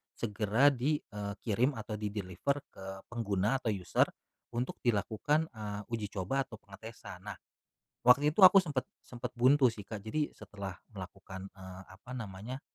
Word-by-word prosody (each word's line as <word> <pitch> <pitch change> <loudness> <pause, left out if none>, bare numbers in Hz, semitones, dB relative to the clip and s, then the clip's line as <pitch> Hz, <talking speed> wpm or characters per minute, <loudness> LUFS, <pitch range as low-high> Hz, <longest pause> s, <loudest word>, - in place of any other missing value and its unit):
segera 110 +5 +3
di, 140 +3 +1
eee, 100 -1 -5
kirim 125 +5 +2
atau 105 -2 -5
di-deliver 105 +5 -1 0.2
ke 95 0 -8
pengguna 110 +2 +1
atau 120 - -5
user 90 -2 +2 0.5
untuk 125 +2 -2
dilakukan, 120 - +1
eee, 105 -2 -5
uji 110 -3 -1
coba 115 +9 0
atau 110 - -9
pengetesan. 100 -2 -10
Nah, 100 - -4 0.7
waktu 140 +4 +7
itu 190 +4 +8
aku 190 +1 +9
sempat 145 -7 -2 0.2
sempat 125 0 -6
buntu 130 +3 +5
sih 105 - -8
Kak. 110 - -5
Jadi, 150 +7 0
setelah 100 -2 -7 0.2
melakukan, 95 0 -8
eee, 95 -1 -9
apa 100 +6 -13
namanya, 115 +2 -6
110 Hz, 150 wpm, -33 LUFS, 100-130 Hz, 0.7 s, aku